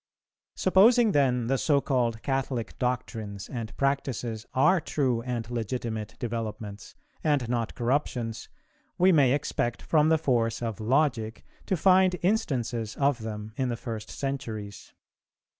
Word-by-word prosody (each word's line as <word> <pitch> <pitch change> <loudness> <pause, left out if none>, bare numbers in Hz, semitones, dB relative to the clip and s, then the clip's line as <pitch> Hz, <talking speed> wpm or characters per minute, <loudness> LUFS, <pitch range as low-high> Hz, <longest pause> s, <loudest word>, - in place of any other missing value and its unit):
Supposing 220 +5 +5
then 125 -6 +2
the 135 +2 +1
so 145 -3 +3
called 120 -5 0
Catholic 135 -4 -2
doctrines 110 -5 -3
and 115 -4 -6
practices 125 -5 -1
are 160 +7 +4
true 130 -8 0
and 120 -2 -3
legitimate 115 -2 -3
developments, 110 -4 -5 0.3
and 145 -6 +1
not 120 -1 -2
corruptions, 120 -2 -1 0.5
we 185 +1 +5
may 140 -7 +5
expect 120 -4 -1
from 155 -1 +3
the 160 - +5
force 120 -7 +1
of 115 -4 -3
logic 115 -2 0 0.2
to 190 - +1
find 185 +1 +5
instances 120 - 0
of 140 -2 +1
them 110 -1 -6
in 130 -2 0
the 120 - -2
first 110 -2 -6
centuries. 115 -7 -5
125 Hz, 130 wpm, -27 LUFS, 115-140 Hz, 0.5 s, Supposing